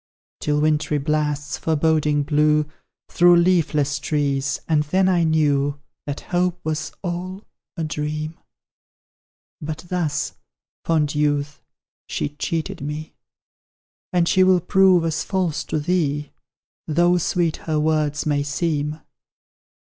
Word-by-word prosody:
"Till 150 0 0
wintry 155 0 +1
blasts 150 -1 -1
foreboding 155 -2 +1
blew 150 +1 +3 0.4
Through 175 0 +5
leafless 160 -5 +2
trees 140 -1 -1
and 155 -2 +3
then 185 +6 +1
I 180 -2 +3
knew 145 -3 +1 0.3
That 145 0 -4
Hope 180 0 -1
was 155 0 -3
all 185 +2 -4 0.3
a 165 - -2
dream. 155 +1 -4 1.2
But 155 +2 -5
thus, 170 -5 -1 0.5
fond 155 -3 +1
youth, 145 -1 0 0.5
she - - -2
cheated 155 +2 -3
me; 150 +2 -5 1.0
And 175 -2 +2
she 185 - +4
will 185 -1 +5
prove 180 -1 +4
as 160 0 -1
false 185 -5 -1
to 155 - -1
thee, 150 -3 -1 0.6
Though 175 +3 +3
sweet 170 -1 0
her 155 -2 -2
words 150 -1 0
may 145 -2 +1
seem. 150 0 -2
155 Hz, 115 wpm, -22 LUFS, 150-170 Hz, 1.2 s, Through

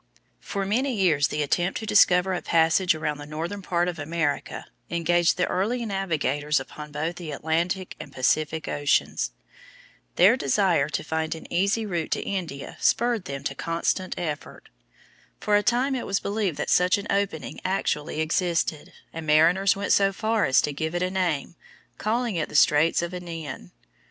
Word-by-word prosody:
For 195 - -4
many 250 +6 0
years 160 -8 +3
the 150 0 -1
attempt 175 +6 0
to 220 - -6
discover 190 -3 +4
a 180 - -2
passage 165 +1 +3
around 150 -2 -3
the 145 - -8
northern 165 +7 -5
part 175 -1 0
of 175 -3 -4
America 150 -1 -2 0.2
engaged 170 0 +2
the 180 - +2
early 230 +6 -1
navigators 150 -8 0
upon 150 +3 -9
both 160 +4 -3
the 170 -3 -7
Atlantic 170 +5 -2
and - - -9
Pacific 155 +4 0
oceans. 145 0 0 0.9
Their 195 +7 +6
desire 170 - +2
to 150 - -2
find 160 0 -2
an 160 - -10
easy 200 +5 +1
route 170 -6 -2
to - - -2
India 170 -8 -5
spurred 235 -4 +1
them 140 0 -6
to 140 - -2
constant 170 +5 -2
effort. 155 -4 -5 0.7
For 210 - +1
a 205 - +4
time 245 +6 +1
it 255 - -3
was 195 - 0
believed 200 -6 -2
that - - -2
such 180 +4 +4
an 200 - -6
opening 200 -6 -2
actually 155 -5 -1
existed, 165 -1 -1 0.2
and 165 -1 -6
mariners 170 +6 +4
went 200 0 0
so 195 -1 +4
far 220 +2 0
as 130 - +4
to 150 - -2
give 160 +4 -3
it 175 - 0
a 185 - -1
name, 175 -5 -1 0.4
calling 230 -2 -1
it 155 - -2
the - - -9
Straits 150 +3 +4
of 170 - -3
Anian. 165 - -7
175 Hz, 170 wpm, -25 LUFS, 155-195 Hz, 0.9 s, Their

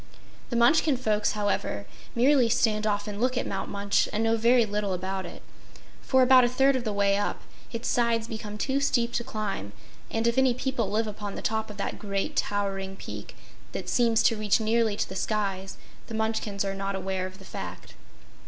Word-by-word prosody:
The 240 - -3
Munchkin 265 +4 +4
folks, 215 -4 +1
however, 205 - -1 0.3
merely 250 0 +4
stand 220 -2 +2
off 205 0 0
and 205 0 -5
look 255 0 +1
at - - 0
Mount 195 0 -3
Munch 200 0 +1
and 215 +2 0
know 225 0 +3
very 235 +1 +4
little 205 -2 -1
about 190 +1 -3
it; - - -11 0.6
for, 260 -1 +4
about 255 0 +7
a 240 - +3
third 270 +2 +3
of 255 - -1
the 220 - -1
way 200 -1 +2
up, 205 - -2 0.3
its 230 0 -4
sides 230 -2 +1
become 215 -2 -6
too 265 +5 0
steep 240 -4 +1
to 235 - 0
climb, 200 - -4 0.4
and 225 0 -1
if 235 +2 +3
any 260 -2 +3
people 250 -5 -1
live 220 +2 +1
upon 205 -1 -6
the - - -6
top 220 0 -1
of 210 - -9
that 200 - -3
great 200 -1 -2
towering 195 -1 -1
peak - - -8 0.4
that - - -4
seems 230 -2 +3
to 225 - +4
reach 210 0 +2
nearly 220 -1 +2
to - - -1
the 190 - -8
skies, 195 -2 -2 0.3
the 225 - -6
Munchkins 220 -2 -1
are 195 - -1
not 195 0 -3
aware 190 -1 -2
of 185 0 -12
the 195 - -14
fact. - - -8
215 Hz, 200 wpm, -27 LUFS, 200-235 Hz, 0.6 s, about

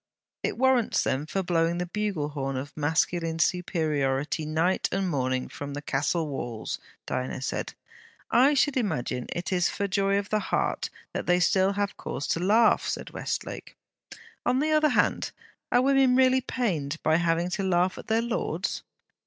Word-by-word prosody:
'It - - -2
warrants 260 -2 +3
them 140 +4 -1
for 195 +4 -1
blowing 170 -1 +1
the 180 - -1
bugle 185 -5 -2
horn 135 -2 -3
of 140 +3 -6
masculine 160 +2 0
superiority 155 -5 0
night 165 +4 +1
and 195 0 0
morning 130 -2 -1
from 145 0 -7
the - - -3
castle 150 +4 0
walls,' 120 -5 -4 0.3
Diana 130 0 -3
said. 130 - -3 0.6
'I 265 +5 +5
should 280 0 +2
imagine 155 - -1
it 175 +2 -3
is 180 -1 +2
for 200 - -2
joy 195 0 +1
of 200 0 -2
heart 210 -2 0 0.2
that - - -4
they 180 0 +4
still 190 +2 +3
have 205 0 -2
cause 145 - -4
to - - +1
laugh!' 215 +6 +4
said - - -4
Westlake. - - -5 0.7
On 250 +1 +2
the 310 +2 +1
other 305 0 +4
hand, - - +1 0.4
are 245 - +4
women 270 -2 +4
really 260 0 +4
pained 170 - -2
by 155 +1 +4
having 170 +1 +1
to 195 - -1
laugh 180 0 +2
at - - -10
their 225 +1 +2
lords? 235 0 -2
180 Hz, 165 wpm, -27 LUFS, 150-215 Hz, 0.7 s, I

